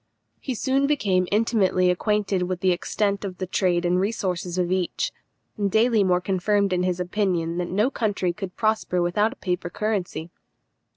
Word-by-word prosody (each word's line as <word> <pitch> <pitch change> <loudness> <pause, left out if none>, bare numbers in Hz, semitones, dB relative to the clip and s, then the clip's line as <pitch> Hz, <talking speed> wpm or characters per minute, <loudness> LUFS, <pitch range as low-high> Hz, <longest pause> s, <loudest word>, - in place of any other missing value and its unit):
He 260 - -4
soon 270 +3 +1
became 195 -11 +1
intimately 200 -4 +2
acquainted 195 -1 0
with 180 -1 -3
the 185 - +3
extent 200 +3 -1
of 185 -3 -5
the 185 - -3
trade 180 -1 +1
and 180 +1 +2
resources 185 -3 -2
of 180 -1 0
each, 185 - -1 0.5
and 200 -1 +1
daily 220 +1 +3
more 180 -2 +3
confirmed 195 +1 +1
in 180 - +1
his 180 -1 0
opinion 180 -3 -1
that 175 - -2
no 210 +8 +1
country 205 -8 -1
could 185 -1 -7
prosper 215 -5 +1
without 195 +6 +1
a - - -19
paper 180 -1 -3
currency. 185 -5 -3
185 Hz, 170 wpm, -24 LUFS, 180-210 Hz, 0.5 s, the